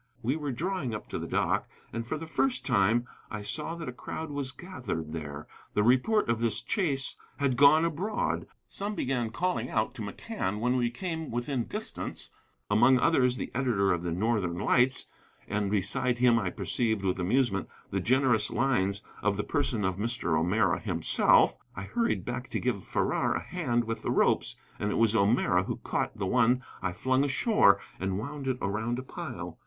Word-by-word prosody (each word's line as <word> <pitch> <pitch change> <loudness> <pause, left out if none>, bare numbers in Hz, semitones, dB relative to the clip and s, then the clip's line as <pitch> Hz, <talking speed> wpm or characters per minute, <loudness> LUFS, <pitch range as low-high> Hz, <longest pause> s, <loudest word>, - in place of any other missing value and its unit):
We 130 +5 +1
were 150 -3 -3
drawing 150 - -2
up - - -8
to - - -3
the - - -5
dock, - - 0 0.2
and 115 0 -4
for 155 - -2
the 165 - -6
first 255 +11 0
time 110 +5 +3 0.2
I 105 -1 -5
saw 155 +9 -1
that 165 -2 -7
a - - -3
crowd 160 +4 -6
was 140 -2 -2
gathered 130 - -5
there. 75 -2 -6 0.3
The 105 - +3
report 130 - +3
of 115 -1 +1
this 115 -2 0
chase 140 -10 0 0.2
had 140 -3 +1
gone 145 +5 +6
abroad. 180 +7 -1 0.2
Some 205 +1 -4
began 125 - -1
calling 135 -1 -1
out 110 +2 0
to 130 - -8
McCann 105 - -4
when 125 +3 +1
we 120 -2 +1
came 160 +5 -4
within 120 +1 -2
distance, - - -5 0.4
among 120 +5 +5
others 125 -3 +3
the - - -5
editor 115 -7 +2
of 85 - -2
the 85 -1 -3
Northern 95 -2 0
Lights, 125 +6 +3 0.4
and 105 -1 -1
beside 120 +5 0
him 120 -1 +4
I 100 -5 -1
perceived 110 +1 -1
with 95 0 0
amusement 100 +1 +1 0.2
the - - 0
generous 125 -4 +3
lines: 105 -5 +1 0.2
of 105 -1 +1
the 105 - -1
person 130 -8 0
of 95 -1 -1
Mr. 105 -6 -1
O'Meara 90 +3 +2
himself. - - +3 0.2
I 100 - -5
hurried 230 - -1
back 125 +1 -4
to - - -2
give 115 -7 -1
Farrar - - 0
a - - 0
hand 125 -10 -1
with 115 -1 -4
the - - -3
ropes, - - +2 0.2
and 105 - -1
it - - -1
was 115 -1 +4
O'Meara 105 +2 +3
who - - -3
caught - - -2
the - - -2
one 125 +3 +3 0.2
I 90 -2 -1
flung 130 +8 +1
ashore 140 - +4 0.2
and 95 0 -1
wound 140 +5 -5
it 130 -1 0
around 110 +5 -1
a 130 - -4
pile. 120 - -7
120 Hz, 185 wpm, -29 LUFS, 105-135 Hz, 0.4 s, gone